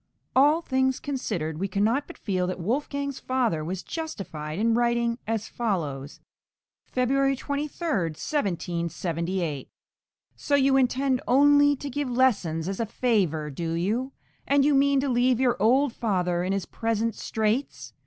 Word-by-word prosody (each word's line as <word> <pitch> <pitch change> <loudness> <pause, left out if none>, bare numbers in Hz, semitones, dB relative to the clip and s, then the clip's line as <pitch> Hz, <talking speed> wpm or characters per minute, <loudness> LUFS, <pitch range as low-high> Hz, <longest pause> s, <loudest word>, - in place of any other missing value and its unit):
All 295 +5 +5
things 260 -2 +1
considered, 180 - -3
we 195 - -1
cannot 220 +8 0
but - - -11
feel 185 -4 -1
that 185 - -4
Wolfgang's 280 - -2
{MANNHEIM.} - - -34
(412) 255 -2 +2
father 155 -2 -2
was 180 +3 -4
justified 180 - -5
in 225 +2 +2
writing 235 0 +1
as 225 -1 -2
follows 155 - -3 0.7
(February 270 +2 +1
23, 290 +5 -4
1778) 170 - -2 0.7
So 285 - 0
you 270 -1 +4
intend 260 0 +2
only 290 +2 +5
to 285 - -7
give 285 0 -3
lessons 200 -11 +1
as 195 0 -3
a 230 - -1
favour, 185 - 0
do 165 +3 -3
you? 220 +11 -1 0.3
and 280 0 +4
you 295 - +4
mean 280 0 +4
to 280 - -1
leave 250 -1 +2
your 255 -2 +3
old 255 +4 +3
father 180 -5 0
in 185 - -1
his 195 -2 -1
present 225 0 -1
straits? 220 +7 -2
235 Hz, 150 wpm, -26 LUFS, 180-270 Hz, 0.7 s, All